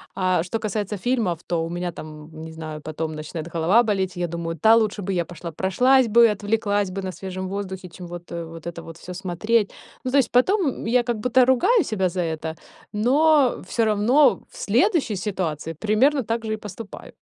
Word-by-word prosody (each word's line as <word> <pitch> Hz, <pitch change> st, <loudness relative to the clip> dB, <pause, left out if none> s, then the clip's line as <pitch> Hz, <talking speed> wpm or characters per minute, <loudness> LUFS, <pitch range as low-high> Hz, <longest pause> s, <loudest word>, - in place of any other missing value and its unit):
А 185 Hz, -2 st, +2 dB
что 205 Hz, +5 st, -3 dB
касается 210 Hz, -1 st, -3 dB
фильмов, 220 Hz, -6 st, 0 dB
то 170 Hz, -2 st, 0 dB
у 165 Hz, -, -4 dB
меня 175 Hz, +1 st, -3 dB
там, 155 Hz, -, -9 dB, 0.3 s
м, 155 Hz, -, -9 dB
не 160 Hz, -, -8 dB
знаю, 155 Hz, -1 st, -7 dB
потом 155 Hz, +1 st, -4 dB
начинает 155 Hz, +1 st, -6 dB
голова 175 Hz, +8 st, +4 dB
болеть. 190 Hz, -5 st, -1 dB
Я 175 Hz, 0 st, -1 dB
думаю: 165 Hz, 0 st, -4 dB
"Та 220 Hz, +8 st, +6 dB
лучше 215 Hz, -2 st, +1 dB
бы 195 Hz, -, -2 dB
я 175 Hz, -2 st, 0 dB
пошла 175 Hz, 0 st, -8 dB
прошлась 250 Hz, -, +3 dB
бы, 235 Hz, +2 st, +6 dB
отвлеклась 205 Hz, -1 st, 0 dB
бы 195 Hz, +1 st, -5 dB
на 185 Hz, -, -3 dB
свежем 185 Hz, 0 st, -6 dB
воздухе, 190 Hz, -2 st, -5 dB
чем 175 Hz, +1 st, -10 dB
вот, 175 Hz, 0 st, -9 dB
э, 170 Hz, 0 st, -4 dB
вот 165 Hz, 0 st, -11 dB
это 170 Hz, 0 st, -6 dB
вот 165 Hz, 0 st, -10 dB
всё 180 Hz, -, -9 dB
смотреть". 195 Hz, +4 st, 0 dB, 0.3 s
Ну, 255 Hz, -, -2 dB
знаешь, 275 Hz, -3 st, +3 dB
потом, 370 Hz, +11 st, +3 dB
м, 265 Hz, -, -3 dB
я 240 Hz, +2 st, +3 dB
как 240 Hz, -2 st, -2 dB
будто 250 Hz, +3 st, +4 dB
ругаю 365 Hz, -, +4 dB
себя 190 Hz, -7 st, 0 dB
за 180 Hz, +1 st, -2 dB
это. 160 Hz, -1 st, -3 dB, 0.4 s
Но 275 Hz, +5 st, +3 dB
всё 230 Hz, +3 st, +1 dB
равно 220 Hz, +7 st, +4 dB
в -, -, -15 dB
следующей 300 Hz, -, +1 dB
ситуации 175 Hz, -5 st, -3 dB
примерно 220 Hz, -, +2 dB
так 230 Hz, +1 st, -2 dB
же 220 Hz, -, -1 dB
и -, -, -2 dB
поступаю. 210 Hz, 0 st, -9 dB
195 Hz, 205 wpm, -23 LUFS, 170-230 Hz, 0.4 s, Та